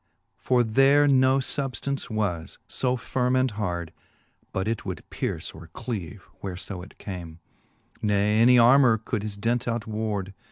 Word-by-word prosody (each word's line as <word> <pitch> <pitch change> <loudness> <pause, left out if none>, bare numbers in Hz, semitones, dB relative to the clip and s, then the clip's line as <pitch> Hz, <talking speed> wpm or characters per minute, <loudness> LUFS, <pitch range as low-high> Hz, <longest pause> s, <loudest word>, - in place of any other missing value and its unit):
For 125 -1 +3
there 135 +6 +4
no 130 -1 +4
fubftance 135 0 -3
was 100 -7 -2
fb 125 -1 0
firme 125 +1 0
and 130 -1 +2
hard. 90 -6 -3 0.6
But 95 +2 -2
it 115 -1 -2
would - - -6
pierce - - -3
or 80 +1 -12
cleave, 100 -10 -5 0.2
where 95 -2 -5
fo 95 -1 -6
it 95 - -13
came; 85 -5 -7 0.6
Ne 105 +1 +2
any 125 +2 +7
armour 120 0 +6
could 110 0 -3
his 105 -1 -5
dint 120 +4 0
out 115 -1 -1
ward. 105 -3 -3
110 Hz, 155 wpm, -26 LUFS, 100-125 Hz, 0.6 s, any